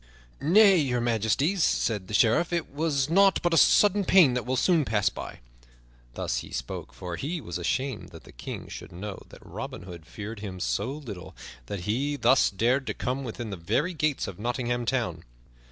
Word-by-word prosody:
"Nay, 195 +6 +6
Your 130 -6 +1
Majesty," 120 - +1
said 110 - +1
the 105 - -3
Sheriff, 120 - +3
"it 170 -2 -2
was 145 -3 0
nought 195 +4 +4
but 175 -1 +2
a - - +4
sudden 205 +5 +5
pain 175 -9 +6
that 125 0 -3
will 130 - 0
soon 165 +3 +3
pass 105 -5 +1
by." - - -9 0.7
Thus - - -2
he - - -5
spake, - - -5
for 90 -2 -6
he 165 - -3
was 90 - -6
ashamed 130 +6 -2
that - - -13
the - - -14
King - - -7
should - - -9
know 95 +3 -7
that - - -15
Robin - - -7
Hood 85 -3 -11
feared 105 +4 -7
him 95 -3 -7
so 60 - -1
little 115 - -8 0.3
that 100 +4 -4
he 130 +10 -1
thus 130 -1 +4
dared 125 +7 +1
to - - -2
come 130 +2 -2
within 115 -2 -6
the 100 - -5
very 150 - 0
gates 155 -3 -1
of 95 -1 -8
Nottingham 120 +1 -2
Town. 90 -12 -1
125 Hz, 190 wpm, -27 LUFS, 100-150 Hz, 0.7 s, Nay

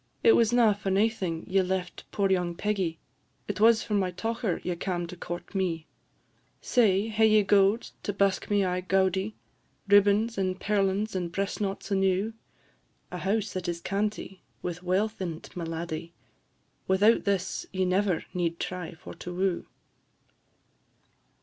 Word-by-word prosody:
It 460 - +7
was 230 - +4
na 235 -3 +5
for 200 -1 -4
naething 195 -4 0
ye 190 +1 +3
left 185 -1 -3
poor 195 -1 +1
young 175 -2 +1
Peggie; 190 -4 -1 0.5
It 205 -2 -3
was 225 +1 +5
for 215 - -4
my 195 -3 +2
tocher 225 +1 -2
ye 180 - -2
cam' 175 0 -2
to 170 - -8
court 175 +2 -7
me. 175 -5 -1 0.7
Say, 215 -3 +2
hae 220 0 +4
ye 215 -1 +5
gowd 200 +2 +3
to - - -2
busk 195 -1 +1
me 205 -2 +3
aye 180 0 -1
gaudie? 190 +2 +1 0.5
Ribbons, 205 +2 +4
and 185 -1 -1
perlins, 200 +1 0
and 175 -2 -2
breast 195 +3 -2
knots 200 +1 -3
enew? 195 +2 +1 0.8
A - - -5
house 205 0 -1
that 185 -1 -4
is 170 -1 -3
canty, 200 0 -3 0.2
with 175 -1 -4
wealth 195 +4 0
in 165 -4 -3
't, - - -15
my 175 -2 -4
laddie? 165 0 -5 0.7
Without 205 +5 +4
this 195 -2 -1
ye 190 -1 0
never 185 -2 +1
need 170 -2 -1
try 180 -1 -5
for 165 - -10
to 180 - -8
woo." 185 0 -1
190 Hz, 155 wpm, -28 LUFS, 180-205 Hz, 0.8 s, It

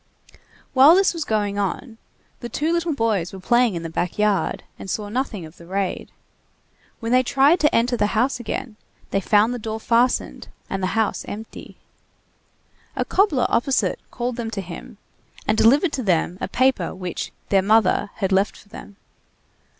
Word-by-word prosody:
While 275 +5 +8
this 390 0 +3
was 330 -3 -4
going 205 -2 -1
on, 220 +4 -3 0.4
the 240 - -6
two 310 +8 -1
little 340 -2 0
boys 215 -8 0
were 190 - -9
playing 240 +1 +2
in 170 - -4
the - - -3
back 175 +2 -2
yard, 210 -2 0 0.2
and 195 - -8
saw 205 +1 -3
nothing 215 -6 -3
of 155 +2 -14
the 170 - -14
raid. 195 0 -3 0.9
When 230 -1 -3
they 255 +1 +5
tried 275 +6 +3
to 300 - +2
enter 245 +2 +2
the 210 - +1
house 250 +2 +1
again, 235 -1 -5 0.3
they 195 - +1
found 215 +4 +3
the 245 - -4
door 220 0 -4
fastened 235 +3 +1 0.2
and 195 - -2
the 185 +4 -2
house 220 -2 0
empty. 220 +2 -9 1.2
A - - -1
cobbler 355 - +2
opposite 260 +3 +1
called 245 0 -4
them 230 -2 -3
to 210 -3 -4
him, 190 +6 -10 0.5
and 215 - +3
delivered 280 - +4
to 265 - -2
them 180 -3 0
a - - -1
paper 255 -9 +1
which 180 -2 -5 0.2
"their 195 -1 +4
mother" 205 0 +3
had 190 0 -2
left 195 +2 +1
for 205 - -19
them. 205 - -11
225 Hz, 175 wpm, -22 LUFS, 195-255 Hz, 1.2 s, While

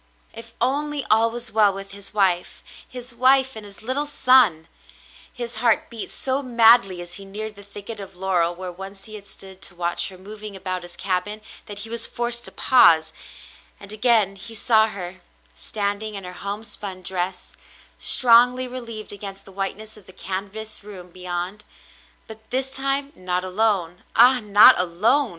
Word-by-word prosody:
If 230 0 -11
only 285 +3 -1
gjl 225 0 +3
was 235 -1 -5
well 210 -2 +4
with 195 0 -9
his 200 0 -9
wife 190 -4 0
— - - -18
his 250 0 -8
wife 265 +2 +4
and 220 - -7
his 205 +1 -12
little 270 +5 0
son! 245 - +4 0.6
His 240 -2 -6
heart 230 0 +1
beat 230 -2 -6
so 265 +1 -1
madly 230 -7 +4
as 175 0 -8
he - - -9
neared 210 +2 -7
the 200 - -12
thicket 205 +2 -8
of 195 -2 -9
laurel 175 -2 0
where 185 0 -6
once 195 +2 -10
he 215 - -11
had 205 -1 -10
stood 190 -1 -11
to 190 - -3
w^atch 175 +1 +1
her 185 - -13
moving 210 +2 -9
about 185 -1 -4
his 175 0 -10
cabin, 195 +3 -2 0.3
that 205 - -8
he - - -11
was 230 0 0
forced 240 0 -2
to - - -7
pause; 165 -11 +4 0.7
and 200 0 -11
again 215 -3 +2
he 225 +3 -10
saw 220 0 +3
her, 185 -3 -8 0.3
standing 210 +1 -4
in 195 - -5
her 180 0 -8
homespun 200 -2 -6
dress, 180 0 -3 0.4
strongly 250 +1 +5
relieved 230 -4 -6
against 195 -1 -8
the 195 - -13
whiteness 200 +3 -5
of 205 - -18
the 185 - -14
canvas 200 +3 -6
room 185 -4 -11
beyond 180 +3 -5 0.3
— - - -29
but 220 0 -13
this 265 +1 -1
time 275 +1 -1
not 180 0 -2
alone 185 -2 0
— - - -35
Ah, 250 +2 +6
not 210 -3 +7
alone 215 +11 +2
210 Hz, 175 wpm, -22 LUFS, 190-235 Hz, 0.7 s, not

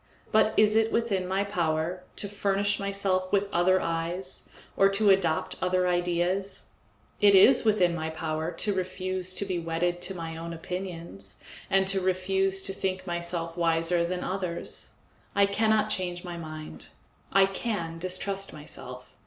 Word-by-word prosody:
But 220 0 +3
is 215 0 +5
it 225 0 +3
within 200 -6 0
my 190 +2 +1
power 175 -2 -1
to 205 - -1
furnish 200 0 0
myself 195 -2 0
with 200 0 +2
other 185 +2 +4
eyes, 170 +3 -3 0.3
or 195 - +5
to 200 +1 +4
adopt 170 -5 +1
other 185 0 +2
ideas? 180 +2 0 0.5
It 200 -1 +6
is 195 +8 +7
within 205 -6 +3
my 160 -1 -3
power 160 0 -3
to 200 +5 -1
refuse 185 0 -2
to 200 - +1
be 185 -2 -2
wedded 170 +1 -1
to 190 +1 -2
my 165 -2 -5
own 170 +1 -6
opinions 165 - -6 0.3
and 195 0 +3
to 195 0 +2
refuse 190 +1 +1
to 195 - -1
think 185 -1 -3
myself 170 -1 -3
wiser 170 0 +2
than 180 +1 -2
others. 180 -3 -4 0.4
I 200 0 +6
cannot 215 +1 +2
change 175 -3 -2
my 175 -1 -6
mind; 155 - -7 0.4
I 195 +1 +6
can 190 -5 -3
distrust 195 +2 -1
myself. 125 -4 -8
185 Hz, 155 wpm, -28 LUFS, 170-195 Hz, 0.5 s, is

